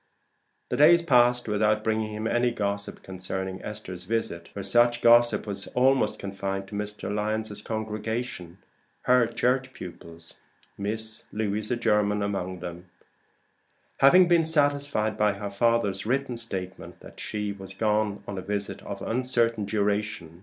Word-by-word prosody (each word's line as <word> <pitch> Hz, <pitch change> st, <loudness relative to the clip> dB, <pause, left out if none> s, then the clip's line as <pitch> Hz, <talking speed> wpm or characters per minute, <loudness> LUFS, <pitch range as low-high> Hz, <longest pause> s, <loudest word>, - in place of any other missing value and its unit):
The -, -, -1 dB
days 170 Hz, +4 st, +6 dB
passed 125 Hz, -5 st, +4 dB
without 105 Hz, 0 st, +1 dB
bringing 110 Hz, -1 st, 0 dB
him 105 Hz, +1 st, -5 dB
any 120 Hz, +2 st, +2 dB
gossip 100 Hz, -3 st, -3 dB
concerning 95 Hz, 0 st, -5 dB
Esther's 95 Hz, -4 st, -6 dB
visit, 90 Hz, -6 st, -2 dB
for 100 Hz, -, -7 dB
such 120 Hz, +4 st, +3 dB
gossip 120 Hz, 0 st, +5 dB
was 100 Hz, -2 st, -6 dB
almost 130 Hz, +1 st, +3 dB
confined 95 Hz, 0 st, -4 dB
to -, -, -12 dB
Mr. 105 Hz, 0 st, -4 dB
Lyon's 105 Hz, 0 st, -2 dB
congregation, 110 Hz, -4 st, -4 dB, 0.5 s
her 125 Hz, -2 st, +4 dB
Church 130 Hz, +3 st, 0 dB
pupils, 85 Hz, -2 st, -11 dB, 0.4 s
Miss 110 Hz, +2 st, -2 dB
Louisa 110 Hz, +2 st, -1 dB
Jermyn 105 Hz, -2 st, +2 dB
among 95 Hz, -3 st, -3 dB
them, 90 Hz, 0 st, -7 dB, 1.1 s
having 180 Hz, +7 st, +7 dB
been 170 Hz, -1 st, +4 dB
satisfied 145 Hz, -8 st, +1 dB
by 105 Hz, -1 st, +3 dB
her 100 Hz, 0 st, -6 dB
father's 105 Hz, -2 st, +1 dB
written 130 Hz, 0 st, 0 dB
statement 95 Hz, -5 st, -4 dB
that -, -, -13 dB
she 105 Hz, -1 st, -3 dB
was 95 Hz, -1 st, -11 dB
gone 105 Hz, -1 st, 0 dB
on 100 Hz, -2 st, -4 dB
a -, -, -5 dB
visit 100 Hz, +1 st, -4 dB
of 100 Hz, -1 st, -7 dB
uncertain 115 Hz, -3 st, 0 dB
duration. 100 Hz, -5 st, -2 dB
105 Hz, 140 wpm, -26 LUFS, 100-120 Hz, 1.1 s, having